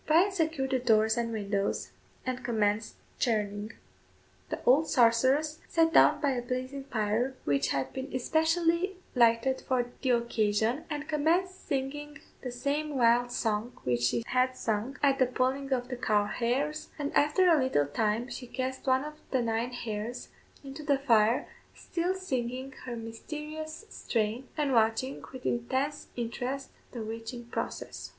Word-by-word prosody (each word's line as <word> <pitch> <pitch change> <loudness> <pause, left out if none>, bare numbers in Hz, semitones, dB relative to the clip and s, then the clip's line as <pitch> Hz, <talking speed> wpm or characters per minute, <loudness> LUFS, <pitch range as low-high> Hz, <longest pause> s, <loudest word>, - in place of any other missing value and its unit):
Bryan 345 +6 +5
secured 315 -7 0
the 260 - +2
doors 220 -2 +4
and 235 -1 -1
windows, 200 -2 -1 0.3
and 255 0 -3
commenced 215 -2 0 0.2
churning. 210 -2 0 0.8
The - - -2
old 285 +6 +5
sorceress 260 +6 +3
sat 325 0 +3
down - - +6
by 285 -2 +2
a 250 -2 -1
blazing 255 +2 -4
fire 230 +2 0
which 140 -1 +2
had 135 -1 -1
been 265 0 -3
specially 335 - +2 0.2
lighted 235 +2 +3
for 255 -2 +1 0.2
the 265 - 0
occasion, 235 +2 +1
and 295 -1 -4
commenced 335 +5 0
singing 290 +1 -3 0.2
the 255 - -4
same 285 +4 -2
wild 240 0 +4
song 225 0 -1
which 120 -1 0
she 125 - +1
had 255 +1 +1
sung 225 +5 -2
at 275 -1 +4
the 255 - +5
pulling 260 +2 -1
of 250 -1 0
the 250 - -4
cow 210 -3 +2
hairs, 265 +8 -1
and 290 -1 -3
after 300 +6 +4
a 325 -5 +5
little 145 - +2
time 215 - 0
she 255 -1 -7
cast 260 +2 -4
one 260 +1 +3
of 300 +1 -6 0.2
the 260 -3 +1
nine 230 +2 -1
hairs 230 0 -5 0.3
into 275 +2 -8
the 285 -2 +2
fire, 230 -4 +3 0.3
still 360 +1 -2
singing 260 -7 -3
her 240 -2 -4
mysterious 305 - -7
strain, 230 - -2
and 290 -3 +1
watching, 225 +3 +1
with 260 -1 -10
intense 265 +5 -1
interest, 245 +3 -3 0.2
the 235 -3 -5
witching 225 +2 -6
process. 235 - -5
255 Hz, 155 wpm, -30 LUFS, 230-285 Hz, 0.8 s, down